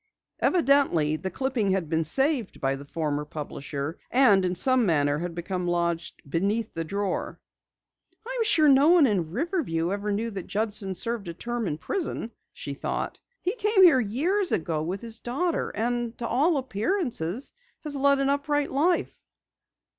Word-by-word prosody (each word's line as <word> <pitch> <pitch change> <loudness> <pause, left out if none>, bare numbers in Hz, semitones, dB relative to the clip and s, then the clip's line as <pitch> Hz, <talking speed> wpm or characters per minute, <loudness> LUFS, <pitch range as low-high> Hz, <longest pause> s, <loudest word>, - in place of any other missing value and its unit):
Evidently 275 - +3
the 170 +5 -4
clipping 250 -1 -1
had 185 -4 -1
been 160 +1 0
saved 265 - +1
by 135 0 0
the 140 - -9
former 150 -1 -2
publisher, 145 0 -6
and 230 -7 +5
in 180 0 -1
some 255 +6 +4
manner 145 -6 +2
had 175 0 -4
become 180 +1 -3
lodged 170 -1 -2
beneath 200 +9 -1
the 165 - -3
drawer. 200 +3 -3 0.9
"I'm - - -1
sure 315 -8 +4
no 280 +2 +6
one 345 -4 +6
in 190 -9 0
Riverview 200 - -1
ever 205 +1 -2
knew 225 +3 -1
that 195 -4 -6
Judson 205 -2 -2
served 230 0 -2
a 170 - -6
term 240 +2 -3
in 150 - -2
prison," 235 - -3 0.2
she 140 - -6
thought. 140 - -4 0.2
"He 370 - 0
came 425 -4 +3
here 330 -8 +7
years 330 - 0
ago 160 -2 0
with 180 +5 -3
his 230 -1 -4
daughter, 330 +8 -1
and 240 +1 -2
to 235 - -4
all 295 +6 +2
appearances 245 - -2 0.3
had 300 -2 -2
led 280 0 +3
an 275 0 +1
upright 285 +1 0
life." 330 +6 0
220 Hz, 160 wpm, -26 LUFS, 170-280 Hz, 0.9 s, here